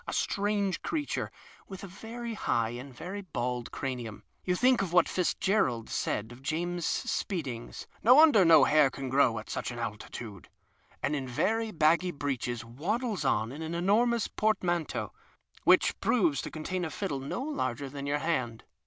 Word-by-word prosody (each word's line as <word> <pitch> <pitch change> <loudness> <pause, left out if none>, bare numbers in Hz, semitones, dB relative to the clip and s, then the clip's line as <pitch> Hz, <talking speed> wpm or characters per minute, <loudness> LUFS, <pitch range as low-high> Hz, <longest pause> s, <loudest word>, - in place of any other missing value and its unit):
A - - -3
strange 200 -2 0
creature 305 -2 -2 0.4
with 190 -1 -9
a - - -6
very 230 +5 -7
high 115 - 0
and 125 +3 -8
very 185 +10 -6
bald 125 -9 -3
cranium 120 -6 -5 0.2
(you 180 - +1
think 250 +3 +4
of 190 -4 -2
what 175 0 +5
Fitz 180 -2 0
gerald 130 - 0
said 110 +2 -2
of 120 +2 -12
James 175 +3 -2
Spedding's: 135 - -3
" - - -30
No 245 +4 +8
wonder 295 -9 +7
no 165 -4 +7
hair 150 -1 +5
can 135 0 -6
grow 130 -3 +3
at - - -6
such - - -3
an 120 - -6
altitude 105 -2 -6 0.3
") - - -32
and 150 - +1
in 135 -3 -3
very 215 - 0
baggy 170 0 +3
breeches 130 -6 -3
waddles 195 - -2
in 110 -4 +1
with 145 +4 -7
an 160 +1 -4
enormous 225 +6 +2
port 215 -2 0
manteau 175 -3 -1 0.3
— - - -29
which - - +5
i)roves 170 - +2
to - - -6
contain 175 +4 -3
a 160 - -2
fiddle 170 -6 -3
no 140 - -4
larger 140 - -2
than 140 +1 -6
your 145 +1 +1
hand. 130 -8 -2
160 Hz, 180 wpm, -29 LUFS, 130-200 Hz, 0.4 s, No